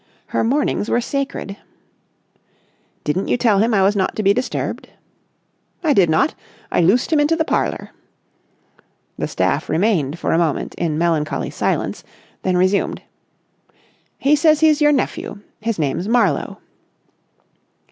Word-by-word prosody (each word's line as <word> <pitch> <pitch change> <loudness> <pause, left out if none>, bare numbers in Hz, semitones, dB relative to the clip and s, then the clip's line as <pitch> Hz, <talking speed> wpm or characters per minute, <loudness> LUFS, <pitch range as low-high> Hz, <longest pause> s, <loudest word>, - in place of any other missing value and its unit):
Her - - 0
mornings 245 -3 0
were - - +2
sacred. 270 -6 -4 1.5
"Didn't 165 +6 -1
you - - +1
tell 220 -5 +3
him 225 +3 +2
I 200 -3 +3
was 200 +2 +3
not 190 -2 0
to 215 - -2
be 200 0 +5
disturbed?" 250 +3 -3 0.9
"I 310 -3 +3
did 185 -9 +4
not. 270 - +2 0.4
I - - +2
loosed 210 - +2
him 305 - +4
into 295 +3 +3
the 320 -1 0
parlour." - - -2 1.3
The - - -1
staff - - -1
remained 165 -6 +1
for - - -2
a 165 - +3
moment 165 -4 -1
in 155 -3 -2
melancholy 160 -2 -1
silence, - - -2 0.4
then 185 -1 0
resumed. 185 +2 +1 1.1
"He 285 +2 +3
says 305 0 +3
he's 310 -1 +4
your 295 0 +5
nephew. 270 -5 -2 0.2
His 225 0 -2
name's 155 +4 -1
Marlowe." 225 -8 +1
210 Hz, 140 wpm, -19 LUFS, 175-275 Hz, 1.5 s, be